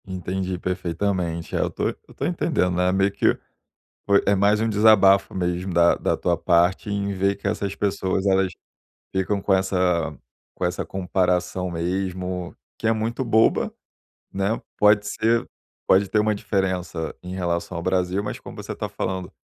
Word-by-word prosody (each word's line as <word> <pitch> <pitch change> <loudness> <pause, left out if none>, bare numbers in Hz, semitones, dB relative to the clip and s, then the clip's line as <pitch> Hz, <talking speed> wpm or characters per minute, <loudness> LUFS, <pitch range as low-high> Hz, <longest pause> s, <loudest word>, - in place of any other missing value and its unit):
Entendi 95 0 -3
perfeitamente, 90 -1 -2
é, - - +1
eu - - +1
tô - - -1
eu - - -11
tô - - -3
entendendo, 90 - 0
né, 90 +1 +2
meio 95 +1 +2
que, - - +2 0.7
foi 100 0 +4
é 100 - +4
mais 100 +2 +3
um 115 - +1
desabafo, 105 -2 +5
mesmo, 90 0 -2
da 85 0 +5
da - - 0
tua 85 -1 0
parte, 90 +4 +2
em 100 0 -1
ver 100 +1 +1
que - - -3
essas 100 -1 -2
pessoas 95 -2 -1
elas 95 -1 +2 0.6
ficam 95 +1 0
com 100 0 +2
essa 90 -5 +1 0.4
com - - -5
essa 90 +1 -2
comparação, 90 -1 -1
mesmo, 90 +1 -3 0.2
que 115 - -2
é 115 - +4
muito 115 +4 -2
boba, 110 -1 +3 0.6
né, 100 +3 -1 0.2
pode 105 0 +4
ser 115 +3 +1 0.4
pode 95 +2 +4
ter 110 - +2
uma 105 0 +2
diferença 90 -5 -2
em 90 +1 -6
relação 85 -1 -2
ao - - -4
Brasil. 95 +1 0
Mas 105 - -5
como - - -11
você - - -6
está - - -5
falando, 95 0 -4
95 Hz, 165 wpm, -23 LUFS, 90-100 Hz, 0.7 s, desabafo